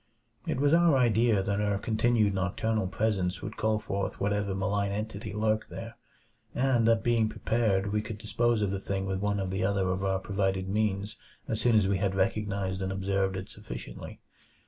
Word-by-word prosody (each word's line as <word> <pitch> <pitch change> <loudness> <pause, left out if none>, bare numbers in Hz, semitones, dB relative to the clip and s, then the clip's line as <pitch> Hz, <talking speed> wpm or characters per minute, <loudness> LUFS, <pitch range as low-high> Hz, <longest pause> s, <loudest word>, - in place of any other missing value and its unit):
It - - -1
was 145 +2 +3
our 170 -4 +5
idea 115 -4 +3
that 100 +1 0
our 105 -1 +1
continued 110 0 +2
nocturnal 95 +2 0
presence 95 -3 -1
would - - -5
call 110 0 +1
forth 100 -2 -3
whatever 100 -1 0
malign 100 +1 0
entity 105 0 -4
lurked 110 +1 0
there; - - -7 0.6
and 125 -3 +2
that 115 -1 +3
being 115 -2 +2
prepared, 105 -4 0
we 105 - +2
could 110 -1 -6
dispose 110 +1 +1
of 100 - 0
the 100 - -2
thing 95 0 -3
with 95 -1 -2
one 100 0 0
or 95 - -1
the 95 0 -2
other 95 -1 +1
of 95 +1 -1
our 95 0 +1
provided 95 -1 -1
means 105 0 -1 0.3
as 110 -1 -2
soon 120 0 +3
as 105 -3 +4
we 95 -1 +1
had 95 -1 0
recognized 100 -1 -1
and 95 0 -2
observed 95 0 0
it 95 - -6
sufficiently. - - -9
100 Hz, 190 wpm, -29 LUFS, 95-110 Hz, 0.6 s, our